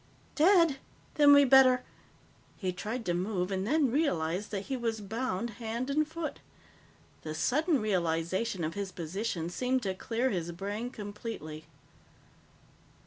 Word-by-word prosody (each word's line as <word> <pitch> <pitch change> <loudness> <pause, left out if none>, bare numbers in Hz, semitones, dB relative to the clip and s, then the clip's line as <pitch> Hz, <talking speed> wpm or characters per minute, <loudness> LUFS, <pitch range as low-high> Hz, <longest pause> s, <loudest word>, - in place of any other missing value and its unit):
"Dead? 335 -3 +5 0.4
Then 290 -1 +6
we'd 285 -2 +6
better 255 -2 +7 0.4
" - - -30 0.3
He 185 -3 -2
tried 225 +6 -4
to 175 - 0
move 180 +1 -1
and 190 +1 -1
then 285 -1 +2
realized 200 - 0
that 200 -2 -3
he 270 - -2
was 230 -3 -2
bound 225 +1 -3
hand 235 +4 -3
and 305 +2 +2
foot. 320 0 -5 0.8
The 155 0 -5
sudden 295 - +2
realization 185 0 -1
of 155 +1 -2
his 200 0 -4
position 175 +1 -3
seemed 255 +5 0
to 190 -2 -1
clear 235 +6 -1
his 175 -2 -2
brain 205 +6 -4
completely. 205 - -7
220 Hz, 140 wpm, -30 LUFS, 185-260 Hz, 0.8 s, better